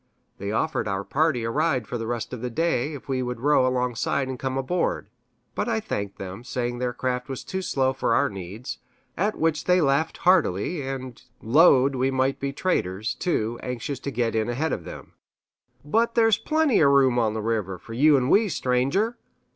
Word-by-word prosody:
They 100 +1 -3
offered 115 +3 -1
our 100 -1 -2
party 150 -1 +1
a 115 - -2
ride 145 -4 +1
for 120 - -5
the 115 - -4
rest 120 0 -3
of 125 - -6
the 125 - -3
day, 155 0 0
if 140 - -11
we 130 -2 -1
would 125 -2 -4
row 140 0 +3
alongside 125 +1 0
and 130 -1 -5
come 130 0 -2
aboard, 135 +7 -1 0.4
but - - -2
I 225 -1 +1
thanked 100 - -4
them, 95 +4 -7
saying 120 -1 -3
their 125 -1 -1
craft 125 +1 -3
was 135 - -5
too 190 - -4
slow 135 -7 0
for 135 - 0
our 140 - +3
needs; 100 +4 -7 0.4
at 205 +4 -1
which 155 -1 0
they 180 0 +4
laughed 150 +1 +1
heartily, 170 - +2
and 130 -2 -6 0.2
"'lowed" 135 +1 +5
we 130 0 +1
might 130 0 0
be 140 0 -2
traders, 110 - -1
too, 120 -9 -1
anxious 125 +2 -4
to 140 - -4
get 120 -3 -1
in 110 +1 0
ahead 145 +7 -1
of 85 - -5
them - - -10 0.7
"but 230 +9 +1
there's 225 -3 +4
plenty 310 - +2
o' - - +6
room 135 -3 +4
o' 110 -2 +2
th' 110 - -4
river, 105 -5 -1
for 115 - -11
yew 145 +4 +5
an' 130 0 0
we, 210 0 +4
stranger! 150 - 0
130 Hz, 200 wpm, -25 LUFS, 120-155 Hz, 0.7 s, o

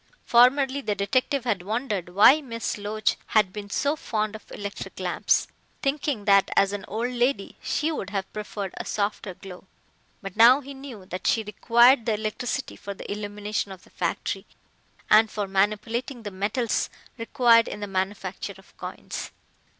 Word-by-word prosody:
Formerly 265 +3 +4
the 210 -6 -1
detective 255 +7 0
had 220 -7 0
wondered 210 -2 -2
why 215 - +7
Miss 230 -5 -4
Loach 215 +1 0 0.2
had 190 -4 +3
been 205 -1 -7
so 285 +8 0
fond 215 -8 -2
of 215 - -12
electric 200 -1 -7
lamps, - - +1 0.4
thinking 275 -6 -1
that 195 -1 +5
as 200 0 +3
an 205 -2 -5
old 230 +4 -2
lady 245 -3 0
she 310 +2 0
would 200 -10 -4
have 195 -2 -4
preferred 210 -2 -5
a - - -3
softer 205 -2 -2
glow. 190 0 -11 0.5
But 195 -2 -8
now 235 +5 +8
he 280 0 -9
knew 265 -8 -10
that 185 0 -5
she 225 - +2
required 235 +3 +4
the 220 - +2
electricity 220 +5 -3
for 200 -1 -7
the - - -8
illumination 205 0 -3
of 185 -1 -11
the - - -21
factory, - - -3 0.6
and 220 +1 +6
for 210 -2 -3
manipulating 215 +6 -1
the 205 - -5
metals 210 +5 -1 0.3
required 230 -1 +4
in - - -6
the 205 - -3
manufacture 195 0 -3
of 190 - -20
coins. - - -6
215 Hz, 165 wpm, -25 LUFS, 200-245 Hz, 0.6 s, now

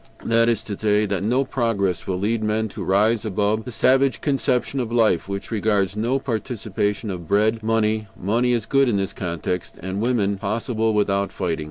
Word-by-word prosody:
That 115 0 +3
is 115 - 0
to 105 - -5
say 105 0 +2
that 100 -3 -2
no 125 +7 +1
progress 105 -9 -1
will 95 - -1
lead 110 +4 -1
men 110 +1 0
to - - -6
rise 105 +4 +2
above 105 +1 0
the 125 - -6
savage 130 +4 +3
conception 135 -1 0
of 120 -3 -3
life, 110 -7 +2
which 100 +3 -5
regards 105 -3 +1
no 115 +5 0
participation 110 -5 -2
of 85 -3 -7
bread, 110 +3 +2
money 110 -1 0
(money 115 +6 +1
is 115 -3 0
good 135 -2 +3
in 105 - +1
this 100 0 -2
context) 90 0 -4
and 95 +2 -4
woman 105 -5 +1
possible 110 +1 -1
without 100 -1 +1
fighting. 85 -3 -2
110 Hz, 185 wpm, -22 LUFS, 100-115 Hz, -, That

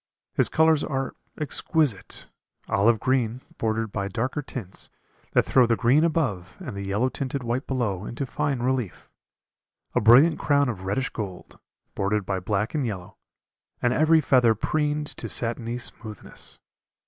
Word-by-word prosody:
His - - +2
colors 160 -1 +3
are 135 -2 -3 0.2
exquisite, 150 - 0 0.4
olive 110 +3 +3
green 130 -2 0 0.2
bordered 110 -1 -1
by 100 -1 -2
darker 120 +8 -2
tints 115 -9 +1 0.4
that - - +4
throw 125 -2 +4
the 115 - +3
green 125 +7 +3
above 130 - -1
and - - -7
the 100 0 -5
yellow 105 +6 +1
tinted 135 0 -3
white 120 +4 -2
below 105 -8 -1
into 135 +4 -4
fine 135 -1 -2
relief; 125 -7 -2 0.8
a - - +2
brilliant 125 +9 +6
crown 145 -2 +2
of 95 -5 -5
reddish 130 +8 -1
gold, 100 -5 -7 0.3
bordered 100 +1 0
by 95 -1 -1
black 100 +3 -1
and 150 -3 0
yellow, 100 -7 -5 0.6
and 120 0 +1
every 160 +2 +4
feather 125 -5 +4
preened 150 +5 -1
to - - -7
satiny 115 0 +1
smoothness. 110 -4 -6
120 Hz, 150 wpm, -25 LUFS, 105-140 Hz, 0.8 s, brilliant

